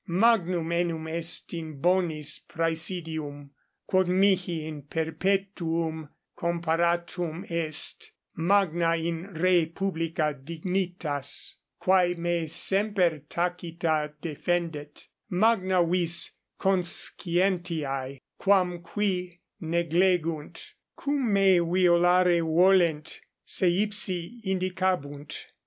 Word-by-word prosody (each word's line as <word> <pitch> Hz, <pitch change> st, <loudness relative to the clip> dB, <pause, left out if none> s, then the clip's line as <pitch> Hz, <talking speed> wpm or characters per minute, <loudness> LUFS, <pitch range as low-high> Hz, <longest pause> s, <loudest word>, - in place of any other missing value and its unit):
Magnum 180 Hz, -4 st, +2 dB
enim 170 Hz, -2 st, -1 dB
est 170 Hz, +2 st, -3 dB
in 160 Hz, -4 st, -7 dB
bonis 165 Hz, -3 st, +1 dB
praesidium, 160 Hz, -3 st, -2 dB, 0.3 s
quod 185 Hz, -1 st, +2 dB
mihi 180 Hz, -3 st, +2 dB
in 155 Hz, -2 st, -6 dB
perpetuum 165 Hz, 0 st, -2 dB, 0.3 s
comparatum 170 Hz, 0 st, -1 dB
est, 165 Hz, -3 st, -2 dB, 0.3 s
magna 170 Hz, -2 st, +2 dB
in 170 Hz, +3 st, -4 dB
re 175 Hz, -1 st, +3 dB
publica 165 Hz, -3 st, -1 dB
dignitas, 170 Hz, -3 st, -2 dB, 0.3 s
quae 185 Hz, -1 st, +3 dB
me 170 Hz, -1 st, -1 dB
semper 190 Hz, -2 st, +1 dB
tacita 170 Hz, -3 st, -1 dB
defendet, 160 Hz, -2 st, -3 dB, 0.2 s
magna 185 Hz, -2 st, +3 dB
vis 170 Hz, 0 st, +1 dB, 0.3 s
conscientiae, 175 Hz, -7 st, -1 dB, 0.2 s
quam 180 Hz, -3 st, +2 dB
qui 180 Hz, -3 st, -2 dB, 0.2 s
neglegunt, 170 Hz, -1 st, 0 dB, 0.3 s
cum 280 Hz, -5 st, 0 dB
me 195 Hz, -2 st, +5 dB
violare 175 Hz, 0 st, +4 dB
volent, 170 Hz, -1 st, +3 dB, 0.2 s
se 185 Hz, -, +2 dB
ipsi 200 Hz, +2 st, 0 dB
indicabunt. 185 Hz, -6 st, -2 dB
170 Hz, 80 wpm, -27 LUFS, 160-185 Hz, 0.3 s, me